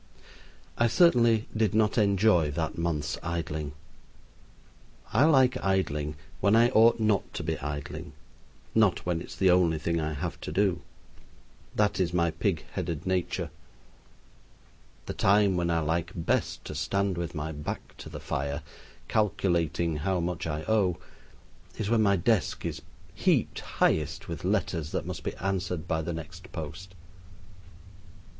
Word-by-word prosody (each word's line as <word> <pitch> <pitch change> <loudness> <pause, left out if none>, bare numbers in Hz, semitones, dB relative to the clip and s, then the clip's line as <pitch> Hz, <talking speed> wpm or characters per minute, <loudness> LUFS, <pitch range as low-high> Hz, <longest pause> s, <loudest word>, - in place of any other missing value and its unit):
I 120 - +5
certainly 115 -5 +4
did 110 -3 +1
not 110 -1 +3
enjoy 100 -6 +4
that 80 +2 -2
month's 80 -3 -2
idling. 80 -3 -3 1.4
I 125 +7 +5
like 135 -5 +4
idling 75 -6 0 0.2
when 100 +3 +4
I 120 +1 +6
ought 115 0 +5
not 105 -3 +1
to - - -3
be - - -2
idling; 75 0 -5 0.6
not 110 -5 +3
when 85 -2 0
it - - -8
is - - -9
the 95 -2 +4
only 90 -3 +3
thing 85 +2 -1
I 75 0 -2
have 70 - -4
to - - -5
do. 95 0 +1 0.9
That 105 -2 +2
is 90 -1 0
my 85 -1 +2
pig 85 +1 -1
headed 85 -2 -3
nature. 95 -2 -1 1.5
The - - -4
time 100 -1 +4
when 85 -1 0
I 85 -1 +2
like 85 +3 -1
best 85 -3 -1
to - - -5
stand 100 -1 0
with 85 -1 -4
my 75 +1 -3
back 75 -1 -6
to - - -9
the - - -7
fire, 70 +1 -3 0.4
calculating 85 -6 +1
how 90 +4 0
much 85 0 -2
I 75 0 -3
owe, 100 -5 +2 0.8
is 110 0 -2
when 115 -2 +4
my 100 -2 +4
desk 95 +1 +1
is - - -3 0.3
heaped - - +1
highest 75 -3 0
with - - -6
letters 80 -2 -1
that - - -1
must - - -5
be - - -3
answered 90 -3 -2
by 80 -1 0
the 80 +2 -3
next 85 +2 -8
post. 90 +4 -7
90 Hz, 150 wpm, -28 LUFS, 80-100 Hz, 1.5 s, I